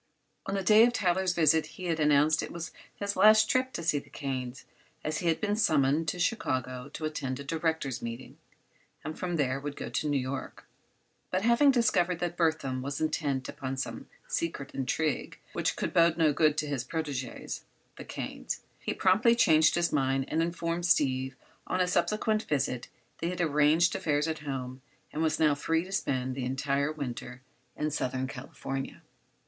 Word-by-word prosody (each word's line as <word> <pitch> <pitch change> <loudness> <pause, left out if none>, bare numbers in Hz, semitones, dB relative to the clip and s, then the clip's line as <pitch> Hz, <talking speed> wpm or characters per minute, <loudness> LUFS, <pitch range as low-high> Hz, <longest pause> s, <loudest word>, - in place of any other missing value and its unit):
On 195 - -1
the 195 - -1
day 215 +4 +7
of 240 +1 +4
Tyler's 185 -4 +1
visit 160 -1 +4
he 185 - -8
had 165 -2 0
announced 150 +1 +4
it - - -6
was 170 -1 -6 0.2
his 200 0 -3
last 215 0 +7
trip 255 +2 +1
to 170 - -4
see 150 -3 +2
the - - -16
Kanes, 130 -2 -4 0.4
as 155 +1 -2
he 175 - -2
had 165 -1 +2
been 210 -1 0
summoned 155 -5 +2
to 155 - -1
Chicago 130 - -1
to 155 - -4
attend 135 -4 -3
a - - -5
directors' 160 -3 -1
meeting 115 +2 -7 0.6
and 155 - -5
from 175 -1 -2
there 135 -3 0
would 145 0 -5
go - - -5
on - - -7
to 150 - -1
New 145 - +2
York. 130 +1 -5 0.6
But 185 +1 0
having 235 +5 +5
discovered 215 -9 +3
that 175 0 -2
Burthon 160 -6 0
was 140 +2 -4
intent 150 -4 -1
upon 135 0 -5
some 135 - -5 0.2
secret 150 -5 -3
intrigue, 140 +3 -1 0.2
which - - 0
could - - -3
bode 170 0 +4
no 155 -3 +4
good 155 0 +3
to 155 - 0
his 140 -4 -2
protégés—the 140 -4 -6
Kanes—he - - -5
promptly 215 +6 +4
changed 160 -9 +5
his 175 0 +1
mind 135 -2 +1
and 160 - +1
informed 170 +1 -1
Steve 130 -4 +2 0.3
on 185 - -1
a 180 - +3
subsequent 215 +3 +1
visit 130 -4 -1 0.3
that - - -3
he - - 0
had 180 -1 -4
arranged 155 +1 +3
affairs 150 0 +1
at 160 -1 -2
home 130 -3 -5 0.3
and 155 - -2
was 160 -1 +1
now 155 -2 +5
free 160 +3 0
to 185 - -10
spend 130 -9 -1
the 130 0 -4
entire 140 +3 0
winter 130 -3 -6 0.3
in 150 0 -1
Southern 130 -2 -1
California. 135 +1 -6
155 Hz, 180 wpm, -29 LUFS, 135-175 Hz, 0.6 s, day